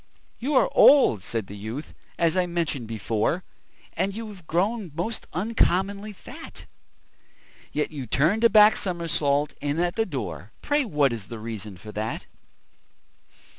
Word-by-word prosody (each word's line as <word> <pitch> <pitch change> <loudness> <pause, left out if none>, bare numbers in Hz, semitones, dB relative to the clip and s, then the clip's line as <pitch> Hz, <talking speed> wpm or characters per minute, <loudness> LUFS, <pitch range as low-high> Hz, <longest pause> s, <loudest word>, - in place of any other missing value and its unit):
"You 275 +4 -1
are - - +5
old," 270 - +6
said 110 +2 -3
the 100 - -9
youth, 110 +9 -6 0.2
"as 165 0 +2
I 180 -1 +2
mentioned 165 -8 -2
before, 110 - -1 0.5
And 195 0 -1
you 225 0 -5
have 185 -6 -13
grown 195 +2 0
most 200 +7 -3
uncommonly 200 +1 0
fat; 200 - -11 1.1
Yet 150 +1 -1
you 140 -5 -6
turned 165 - +2
a 230 - +7
back 215 -1 +7
somersault 150 -5 0
in 145 +2 -1
at 175 +1 0
the 225 - +1
door 105 - -5
Pray 290 -1 +2
what 150 - +2
is 110 -4 -6
the 115 - -7
reason 110 -3 -7
for 105 +4 -10
that?" 110 +1 -4
160 Hz, 150 wpm, -25 LUFS, -, 1.1 s, a